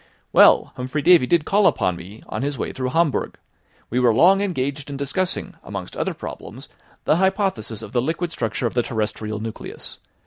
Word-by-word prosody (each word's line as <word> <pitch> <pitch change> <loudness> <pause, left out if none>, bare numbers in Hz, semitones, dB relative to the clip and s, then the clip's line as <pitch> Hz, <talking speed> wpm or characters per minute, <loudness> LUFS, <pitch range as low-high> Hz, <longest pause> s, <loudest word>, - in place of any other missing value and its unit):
"Well, - - +6
Humphry 130 +4 -3
Davy 170 -5 +6
did 170 0 +2
call 205 +1 +4
upon 90 -1 +1
me 95 +6 -11
on - - -4
his 140 0 -2
way - - -3
through 130 -1 -2
Hamburg. 165 0 0 0.5
We 125 - +1
were 125 -2 +4
long 190 - +5
engaged 145 -6 -2
in 140 - -5
discussing, 175 +7 -2
amongst - - -7
other - - -2
problems, - - -8 0.4
the 155 - +3
hypothesis 190 - 0
of 105 - -9
the 120 - +1
liquid 165 +5 -2
structure 115 -4 -2
of 115 - -1
the 125 - +2
terrestrial 110 -2 -3
nucleus. 110 0 -7
130 Hz, 180 wpm, -22 LUFS, 115-170 Hz, 0.5 s, Well